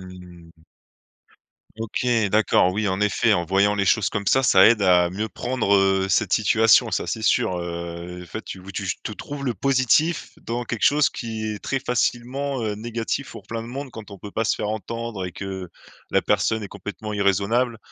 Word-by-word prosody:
Mmh 90 -2 -13
mh. - - -23 1.2
OK 115 +2 -3 0.2
d'accord. 105 -3 +3
Oui, 105 +2 -1
en 95 +1 -1
effet, 105 +2 +2
en 85 -4 +1
voyant 100 +3 +3
les 100 -1 0
choses 110 +1 +3
comme 100 -1 -3
ça, 130 - +4
ça 130 - +6
aide 115 -3 +4
à 90 -2 +4
mieux 105 +5 -4
prendre, 120 -5 0
heu, 95 -1 +3
cette 110 -5 +2
situation, 110 0 +4
ça - - -1
c'est - - -3
sûr, 90 - +2
heu, 85 +1 -6
enfin 90 +5 -7
tu 95 - -7
ou 95 +2 -10
tu 100 +1 -4
j 90 - -2
te - - -5
trouves 145 +6 -7
le 120 - 0
positif 135 - +1
dans 120 +2 -3
quelque 115 -1 -5
chose 145 0 +4
qui 110 -2 -5
est 105 -1 -3
très 135 - 0
facilement, 125 +2 -1
heu, 105 -1 -1
négatif 115 +5 -4
pour - - -10
plein 115 0 -4
de 115 - -9
monde 135 +2 -6
quand 110 -4 -10
on 100 - -10
peut 105 - -9
pas 110 +3 -1
se - - +2
faire 105 - -3
entendre 110 -1 -4
et 90 - -5
que 95 -2 -6 0.4
la - - +3
personne 110 -1 +1
est 100 - -6
complètement 105 +2 -7
irraisonnable, 105 +4 +1
105 Hz, 205 wpm, -23 LUFS, 95-115 Hz, 1.2 s, ça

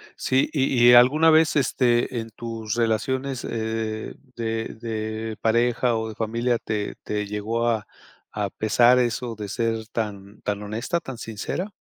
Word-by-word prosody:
sí, 130 +1 +1
y 130 -4 +3
y, - - +9
¿alguna 135 +7 +7
vez 160 0 +4
este, 125 -3 +2
en 115 0 -6
tus 110 -1 -5
relaciones, 125 +3 -1
eh, 110 -1 -3 0.2
de 115 -1 -2
de 110 -1 -4
pareja 120 +1 +2
o 110 0 -2
de 110 - -8
familia, 115 +2 0
te 105 -2 -3
te 105 0 -2
llegó 110 +3 -1
a 110 -3 0 0.4
a 105 -2 -2
pesar 120 +3 +4
eso 120 -1 -1
de 105 -1 -6
ser 115 0 -2
tan 105 -3 -5
tan 105 0 -2
honesta, 110 +11 -2
tan 130 -6 -8
sincera? 115 - -4
115 Hz, 150 wpm, -24 LUFS, 110-120 Hz, 0.4 s, y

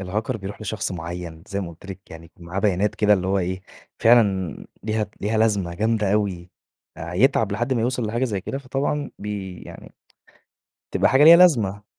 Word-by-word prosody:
الHacker 105 +6 -3
بيروح 100 +1 -8
لشخص 105 -1 -3
معين، 85 -1 -7
زي 100 -1 -3
ما 90 - -5
قلت 85 +3 -15
لك 95 0 -10
يعني 80 +1 -11
معاه 85 +3 -6
بيانات 100 0 +1
كده 105 -1 +3
اللي 95 -2 +1
هو 100 +1 +1
إيه، 95 +1 -2 0.4
فعلًا 100 -7 +3 0.3
ليها 110 0 -1
ليها 110 +2 0
لازمة 100 -6 +1
جامدة 110 0 0
أوي، 95 -4 -1 0.5
آآ، 85 +2 -7
يتعب 110 0 +2
لحد 120 +5 -1
ما 120 - 0
يوصل 120 0 -1
لحاجة 120 +4 -1
زي 105 -6 -2
كده 135 +8 -5
فطبعًا 140 +2 -2
بي 100 -3 -6
يعني - - -12 1.0
تبقى - - +2
حاجة 135 +3 +5
ليها 165 +1 +10
لازمة. 110 - +3
105 Hz, 180 wpm, -23 LUFS, 95-115 Hz, 1.0 s, ليها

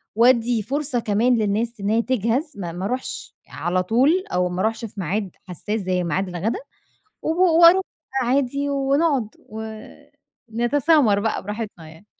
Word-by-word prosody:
وادِّي 235 -1 +4
فرصة 270 +2 -1
كمان 230 +3 +2
للناس 220 +2 0
إن 200 0 -2
هي 225 +2 +3
تجهَز 255 - -1
ما 175 -4 -4
ما 180 +3 -5
اروحش 255 +3 -4
على 175 +5 -1
طول 270 - +3
أو 180 0 +1
ما 180 +1 -3
أروحش 225 +2 -1
في 210 - -10
ميعاد 190 +2 -2 0.2
حساس 205 +5 -3
زي 185 -1 -1
ميعاد 190 +3 -1
الغدا، 180 +6 -2 0.6
و - - -3 0.3
وأروح 360 +3 +8 0.4
عادي 280 +3 0
ونقعد 280 -2 +1 0.2
و 220 +1 -6 0.9
نتسامر 245 -1 +3
بقى 220 +2 -2
براحتنا 205 -5 -6
يعني. 160 +5 -16
225 Hz, 150 wpm, -22 LUFS, 195-260 Hz, 0.9 s, وأروح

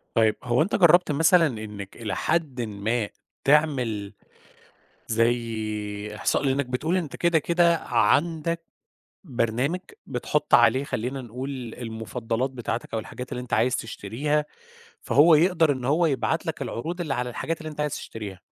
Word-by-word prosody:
طيّب 110 -2 +4
هو 125 +3 +2
أنت 180 - +1
جرّبت 175 -2 +5
مثلًا 165 +3 +5
إنّك 105 -5 -7
إلى 110 -4 -3
حدٍ 155 -7 0
ما 110 +1 -2 0.3
تعمل 130 -9 +2 1.0
زي 110 -3 -1
إحصاء؟ 105 - 0
لأنك 135 0 +1
بتقول 150 +8 -1
أنت 170 -6 -3
كده 170 -1 +3
كده 170 +2 +3
عَندك 160 +8 +1 0.6
برنامج، 130 +5 -1 0.3
بتحط 135 +3 0
عليه 120 +3 +5
خلّينا 130 -1 -3
نقول 125 0 -6
المفضلات 115 +2 -3
بتاعتك 120 -2 -4
أو - - +1
الحاجات 125 +3 -8
اللي 125 - -3
أنت 125 -1 -10
عايز 125 +3 +2
تشتريها، 130 +8 -2 0.6
فهو 150 +7 +5
يقدر 165 -1 +4
إن 130 -2 -5
هو 155 +6 +3
يبعت 130 -7 0
لك - - -3
العروض 170 +10 -4
اللي 155 -5 -1
على 125 0 -2
الحاجات 165 +7 -3
اللي 155 -1 -6
أنت 150 -1 -7
عايز 150 -1 -1
تشتريها. 100 -5 -7
125 Hz, 145 wpm, -25 LUFS, 115-155 Hz, 1.0 s, جرّبت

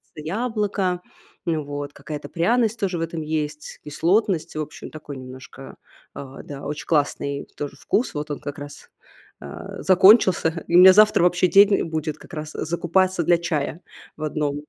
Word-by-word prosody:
яблоко. 195 +1 -2 0.4
Ну 160 -3 -1
вот. 145 0 -6
Какая-то 145 +1 -8
пряность 225 +6 +1
тоже 190 -4 -1
в - - -4
этом 165 0 -4
есть, 150 -1 -4
кислотность. 170 +4 0
В 155 - -2
общем, 150 - -8
такой 150 -2 -9
немножко, 130 +1 -11 0.4
а, 135 -1 -9
да, 140 -1 -9
очень 150 0 -5
классный 140 -2 -1
тоже 145 -1 -6
вкус. 245 - -1
Вот 150 0 -5
он 145 - -4
как 145 +1 -7
раз, 145 0 -11 0.5
а, - - -9
закончился. 185 -3 +5
И 170 - 0
у - - +9
меня 185 +1 +10
завтра 215 -2 +5
вообще 180 +1 +3
день 200 +2 +5
будет 155 -2 -3
как 175 - -16
раз 155 -1 -6
закупаться 175 +2 0
для 170 +2 +4
чая 165 -1 -3 0.4
в 155 - -6
1. 145 -1 -2
160 Hz, 165 wpm, -23 LUFS, 145-185 Hz, 0.5 s, меня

